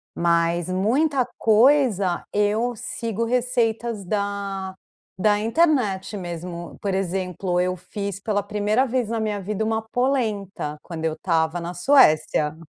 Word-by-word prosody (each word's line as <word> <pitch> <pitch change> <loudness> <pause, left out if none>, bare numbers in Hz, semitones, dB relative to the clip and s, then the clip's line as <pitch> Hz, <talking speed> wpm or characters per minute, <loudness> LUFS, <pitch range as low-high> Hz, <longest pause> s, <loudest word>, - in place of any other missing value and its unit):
mas 170 0 +1
muita 255 +9 +1
coisa 220 -5 +3
eu 215 +4 +1
sigo 230 -2 -3
receitas 235 -3 0
da 200 -1 -3 0.5
da 210 -1 +4
internet 225 - +1
mesmo. 175 -2 -6
Por 195 -2 -1
exemplo, 185 -1 -1
eu 185 0 +1
fiz 200 +2 -6
pela 205 -1 0
primeira 210 +5 +1
vez 245 -2 -1
na 230 - -1
minha 210 -2 -2
vida 210 +3 -2
uma 220 0 0
polenta 215 - -1
quando 165 -2 -7
eu 160 - +1
estava 165 0 0
na 170 +1 -5
Suécia. 155 - +4
205 Hz, 130 wpm, -23 LUFS, 180-230 Hz, 0.5 s, da